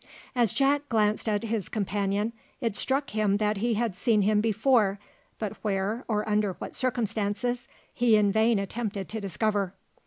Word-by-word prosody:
As 235 -5 +3
Jack 285 +1 +2
glanced 215 -1 +1
at 205 0 0
his 220 -4 -2
companion, 205 +1 -1 0.3
it 230 -6 -1
struck 270 +6 0
him 210 -2 +2
that 210 0 0
he 230 +3 +1
had 225 -3 -1
seen 210 +2 +2
him 210 +1 +3
before, 220 -2 +2 0.4
but 215 -3 -3
where, 205 +3 -1
or 215 -1 -1
under 210 -2 +1
what - - -8
circumstances, 240 -1 -1 0.3
he 235 -3 +4
in 205 -1 +4
vain 220 +2 +3
attempted 200 0 -3
to 220 0 -4
discover. 200 0 -1
215 Hz, 160 wpm, -27 LUFS, 205-235 Hz, 0.4 s, he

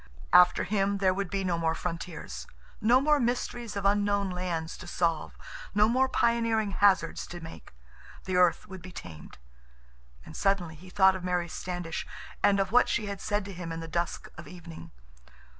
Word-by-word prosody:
After 180 0 +6
him, 200 0 0
there 190 -1 +3
would 195 -1 -3
be 195 -1 -2
no 175 -2 0
more 165 -1 +1
frontiers. 165 - -6 0.3
No 235 +4 +5
more 300 +2 +3
mysteries 240 -2 -2
of 200 -1 -3
unknown 200 -1 +2
lands 175 -3 -3
to 185 - -10
solve. 170 -2 -1 0.4
No 210 +1 +5
more 260 +3 +2
pioneering 230 -4 +1
hazards 195 -4 +2
to 175 - -8
make. 80 - -11 0.5
The 185 - -3
earth 180 +3 +3
would 190 -2 -9
be 185 +2 -10
tamed. 80 - -10 0.9
And 80 - -11
suddenly 195 -5 0
he 175 +4 -13
thought 190 0 +5
of 185 - -6
Mary 180 -1 0
Standish 175 0 -5 0.3
and 200 -1 +4
of 195 0 0
what 245 +1 +5
she 220 - 0
had 200 -1 -5
said 205 -1 -1
to 200 - -7
him 175 -2 -6
in 165 - -4
the 165 - -6
dusk 170 +1 -2
of 160 - -10
evening. 170 -2 -10
185 Hz, 180 wpm, -28 LUFS, 170-205 Hz, 0.9 s, After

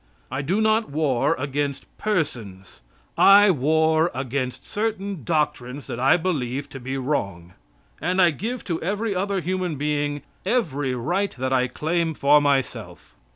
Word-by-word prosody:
I 130 +2 -2
do 185 +9 0
not 220 +1 +2
war 145 0 +1
against 140 +1 -2
persons. 110 - -3 0.4
I 200 0 +8
war 160 +2 +2
against 130 0 -3
certain 200 - -3
doctrines 145 -3 -1
that 120 - -6
I 135 +6 +4
believe 140 -6 -2
to 135 - -8
be 130 +2 -4
wrong. 100 - -3 0.5
And 185 +1 0
I 175 -2 +6
give 230 - -4
to 170 -3 -3
every 205 +4 -1
other 195 +1 -1
human 180 -2 -2
being 145 0 -1 0.2
every 145 - 0
right 175 +11 -1
that 130 +1 -1
I 125 -1 +2
claim 160 +4 -1
for 145 +2 +5
myself. 140 -3 -2
150 Hz, 145 wpm, -23 LUFS, 130-185 Hz, 0.5 s, I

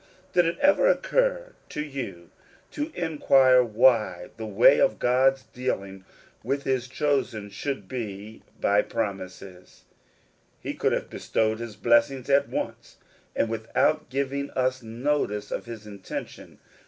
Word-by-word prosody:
Did 175 -2 +4
it 170 - -2
ever 290 +12 +4
occur - - +1 0.2
to - - -4
you 115 - -7 0.4
to 300 +2 -4
inquire 135 -6 +4
why 110 -6 +2
the 110 -1 -5
way 115 +7 +5
of 110 - +3
God's 130 +2 +2
dealing 100 -7 -4 0.4
with 140 +4 -1
his 130 -2 -1
chosen 130 -7 -1
should 105 -1 -4
be 110 -3 -6 0.2
by 100 +1 +3
pro^n 105 -4 -2
ises? 90 0 -12 0.8
He - - -5
could - - 0
have - - -2
bestowed 110 0 -1
his 115 -3 -7
blessings 120 +5 +2
at 140 +1 +3
once, - - -5 0.4
and - - +1
without 115 +1 0
giving 140 +1 -2
us 130 0 0
notice 115 -3 -2
of - - -3
his 115 -2 -9
intention. 100 -2 -8
120 Hz, 135 wpm, -26 LUFS, 105-140 Hz, 0.8 s, way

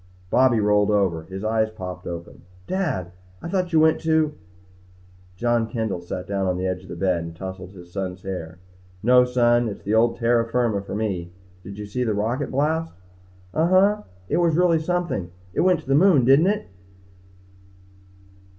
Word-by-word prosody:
Bobby 130 -3 +4
rolled 105 0 +3
over. 95 -6 +1
His 95 +2 -7
eyes 110 0 +1
popped 90 -4 -8
open. 85 0 -7 0.2
"Dad! 135 - -2 0.3
I - - -7
thought 180 -1 -1
you 160 - +4
went 160 0 +4
to 160 -2 +2 0.5
" 90 0 -28
John 120 0 +1
Kendall 110 -7 -3
sat 90 +1 -6
down 100 -1 -1
on 90 -1 0
the 90 - -2
edge 90 -1 -2
of 95 - -15
the - - -6
bed 90 -1 0
and 85 0 -8
tousled 95 +1 -8
his 85 -2 -13
son's 95 -1 -4
hair. 90 -3 -6 0.5
"No, 125 +2 +6
son. 120 -1 +2
It's 100 - -8
the 105 - -1
old 115 +1 +3
terra 115 0 +2
firma 115 -4 +1
for 100 - -7
me. 95 -5 -3 0.3
Did 100 +1 -9
you 105 - -6
see 125 +5 -2
the 110 -3 0
rocket 120 +7 -1
blast?" 160 +4 -1 0.6
"Uh 160 +2 +2
huh. 200 +3 +3 0.2
It - - 0
was 170 -2 +2
really 175 -2 +4
something. 160 - -2 0.2
It - - +1
went 180 -2 +3
to 145 - -22
the 135 - +2
moon, 150 -4 +5
didn't 135 +7 +5
it?" 210 +1 0
110 Hz, 185 wpm, -23 LUFS, 95-150 Hz, 0.6 s, No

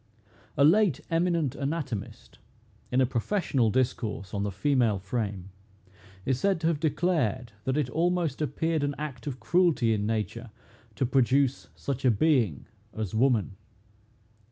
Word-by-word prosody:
A 140 - +5
late 175 - +4
eminent 165 -5 +1
anatomist, 140 -7 -5 0.5
in 125 +1 +3
a - - +5
professional 130 - 0
discourse 110 -5 -1
on 100 - -1
the 100 0 -1
female 120 0 +2
frame, 100 -2 -4 0.7
is 130 -1 0
said 195 -3 +1
to - - -2
have 160 -3 -1
declared, 150 - 0
that 130 +2 0
it 150 -4 +1
almost 165 0 0
appeared 160 +1 0
an 145 0 -1
act 145 -4 -6
of 130 -3 -4
cruelty 170 -10 +2
in 105 -1 -1
nature 115 +2 -3 0.5
to 130 - 0
produce 135 +1 +2
such 135 -2 -4
a 130 - +5
being 115 - +2 0.3
as 110 -4 -3
woman. 110 -5 +1
130 Hz, 140 wpm, -28 LUFS, 115-155 Hz, 0.7 s, A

